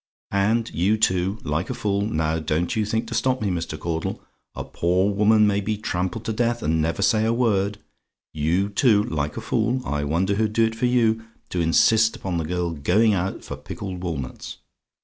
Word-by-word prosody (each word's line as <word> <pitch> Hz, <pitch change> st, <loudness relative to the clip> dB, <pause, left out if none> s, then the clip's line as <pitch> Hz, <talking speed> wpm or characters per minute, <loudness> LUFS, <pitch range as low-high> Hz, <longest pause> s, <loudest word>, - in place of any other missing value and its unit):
And 110 Hz, +4 st, +1 dB
you, 95 Hz, +6 st, +2 dB
too, 95 Hz, -1 st, +1 dB
like 75 Hz, +4 st, -2 dB
a -, -, -3 dB
fool 100 Hz, -1 st, -1 dB
now, 80 Hz, -6 st, 0 dB
don't 80 Hz, +7 st, -1 dB
you 110 Hz, -2 st, 0 dB
think 110 Hz, +2 st, -1 dB
to -, -, -5 dB
stop 130 Hz, +2 st, +1 dB
me, 105 Hz, -, -1 dB
Mr. 85 Hz, -3 st, -3 dB
Caudle; 80 Hz, -1 st, -3 dB, 0.4 s
a -, -, -4 dB
poor 90 Hz, +4 st, 0 dB
woman 105 Hz, +1 st, +4 dB
may 100 Hz, -1 st, +2 dB
be 105 Hz, +1 st, -2 dB
trampled 100 Hz, +2 st, -3 dB
to 110 Hz, -, -1 dB
death, 120 Hz, +1 st, 0 dB
and 80 Hz, +1 st, +1 dB
never 80 Hz, +1 st, -1 dB
say 110 Hz, -3 st, +3 dB
a 110 Hz, -, +2 dB
word 105 Hz, -4 st, +1 dB, 0.6 s
you, 85 Hz, +6 st, 0 dB
too, 105 Hz, 0 st, +3 dB
like 75 Hz, -5 st, -3 dB
a -, -, -3 dB
fool 120 Hz, +3 st, 0 dB
I 75 Hz, 0 st, -2 dB
wonder 85 Hz, +7 st, +1 dB
who'd 105 Hz, +1 st, 0 dB
do 115 Hz, +1 st, +4 dB
it 110 Hz, -, -1 dB
for 115 Hz, +2 st, 0 dB
you 115 Hz, -2 st, +2 dB, 0.3 s
to 90 Hz, -, -1 dB
insist 110 Hz, +7 st, +4 dB
upon 90 Hz, -3 st, -3 dB
the 80 Hz, -, -2 dB
girl 90 Hz, +1 st, -2 dB
going 90 Hz, +9 st, +2 dB
out 95 Hz, 0 st, -2 dB
for -, -, -6 dB
pickled 95 Hz, -3 st, -7 dB
walnuts. 75 Hz, -8 st, -5 dB
100 Hz, 200 wpm, -23 LUFS, 85-110 Hz, 0.6 s, woman